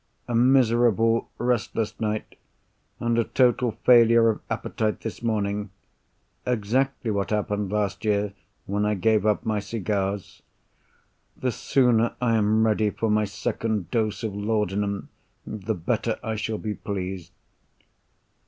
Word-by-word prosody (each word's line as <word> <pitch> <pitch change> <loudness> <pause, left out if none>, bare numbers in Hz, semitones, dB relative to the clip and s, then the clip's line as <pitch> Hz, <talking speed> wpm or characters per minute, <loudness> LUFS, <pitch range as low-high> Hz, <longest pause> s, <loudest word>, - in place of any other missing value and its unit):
"A 120 - -3
miserable, 115 -2 +3
restless 115 -2 -1
night; 110 -1 -2 0.7
and 120 0 +1
a - - +4
total 125 -1 +2
failure 115 -1 +6
of 110 - -2
appetite 110 -1 -2
this 110 - -6
morning. 105 -3 -1 0.7
Exactly 125 +2 0
what 100 -1 -1
happened 105 -2 -1
last 105 -1 -1
year, 105 -1 +1 0.3
when 100 +1 -1
I 105 0 +1
gave 110 +2 +2
up 105 - +1
my 110 -1 0
cigars. 100 -2 -3 1.0
The 125 - -1
sooner 120 -1 +2
I 120 -2 +1
am 110 +1 +3
ready 110 -1 +2
for 110 +1 -1
my 105 0 +3
second 110 -2 -3
dose 110 -2 -1
of 110 -3 -2
laudanum, 105 -1 -1 0.4
the 110 +1 -3
better 85 -2 -1
I 110 0 -2
shall 110 +1 -2
be 105 -1 -3
pleased." 95 -4 -5
110 Hz, 130 wpm, -25 LUFS, 105-115 Hz, 1.0 s, failure